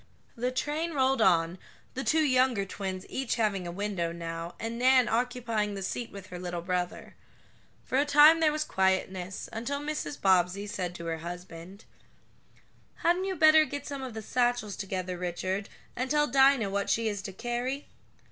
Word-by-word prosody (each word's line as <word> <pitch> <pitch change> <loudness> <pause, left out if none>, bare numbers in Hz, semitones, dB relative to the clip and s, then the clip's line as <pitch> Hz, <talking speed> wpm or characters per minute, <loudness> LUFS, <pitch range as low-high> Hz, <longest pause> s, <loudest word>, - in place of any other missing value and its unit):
The 245 +1 -1
train 295 +6 -2
rolled 265 -2 +2
on, 175 -3 +3 0.3
the 265 - -3
two 315 +2 +3
younger 255 -7 +2
twins 190 -1 -5
each 265 -2 -2
having 205 -6 0
a - - -4
window 190 -3 -2
now, 165 0 -6
and 230 +1 -4
Nan 255 -1 +5
occupying 230 -3 -1
the 195 - -5
seat 235 +5 -4
with 200 -2 -9
her 180 - -6
little 175 -1 -4
brother. 180 0 -3 0.7
For 260 - +1
a - - +4
time 295 +3 +7
there 315 -2 +4
was 305 0 -1
quietness, 190 -3 -1
until 255 +6 -3
Mrs. 295 0 -4
Bobbsey 190 +1 +2
said 185 -4 -4
to 170 - -7
her 165 -1 -3
husband: 175 +3 -9 1.2
"Hadn't 350 +2 +2
you 385 -1 -2
better 310 -1 +7
get 285 -2 -5
some 280 -2 -5
of 255 -4 -6
the 220 - -5
satchels 245 -3 0
together, 185 -2 -4
Richard, 185 +3 -3 0.3
and 255 +2 -2
tell 295 +1 +3
Dinah 265 -6 +4
what 200 0 -1
she 230 0 +1
is 205 -2 -2
to 195 - -6
carry?" 245 +7 -3
220 Hz, 175 wpm, -29 LUFS, 185-265 Hz, 1.2 s, time